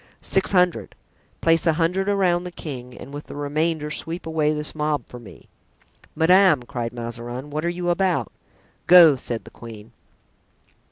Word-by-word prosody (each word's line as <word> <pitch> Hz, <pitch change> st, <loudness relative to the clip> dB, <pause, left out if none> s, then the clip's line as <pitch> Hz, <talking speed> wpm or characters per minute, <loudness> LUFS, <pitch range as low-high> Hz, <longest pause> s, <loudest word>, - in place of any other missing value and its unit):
"Six 190 Hz, -, 0 dB
hundred." 180 Hz, -2 st, +1 dB, 0.5 s
"Place 165 Hz, +1 st, +3 dB
a 165 Hz, -, +4 dB
hundred 180 Hz, +5 st, 0 dB
around 180 Hz, -3 st, +1 dB
the 180 Hz, -, -7 dB
king 125 Hz, -7 st, -8 dB
and 140 Hz, -, -11 dB
with 145 Hz, +1 st, -8 dB
the -, -, -9 dB
remainder 150 Hz, +1 st, -2 dB
sweep 165 Hz, +2 st, -4 dB
away 160 Hz, -2 st, 0 dB
this 150 Hz, 0 st, -3 dB
mob 150 Hz, -1 st, -2 dB
for 125 Hz, -, -11 dB
me." 115 Hz, -, -14 dB, 0.7 s
"Madame," 170 Hz, -3 st, +4 dB
cried 120 Hz, -2 st, -5 dB
Mazarin, 120 Hz, +3 st, -7 dB
"what 155 Hz, +1 st, -3 dB
are 170 Hz, -, 0 dB
you 175 Hz, 0 st, -2 dB
about?" 175 Hz, -, 0 dB, 0.6 s
"Go!" 170 Hz, -4 st, +8 dB
said 120 Hz, -3 st, -4 dB
the -, -, -14 dB
queen. 115 Hz, -1 st, -12 dB
155 Hz, 160 wpm, -22 LUFS, 125-175 Hz, 0.7 s, Go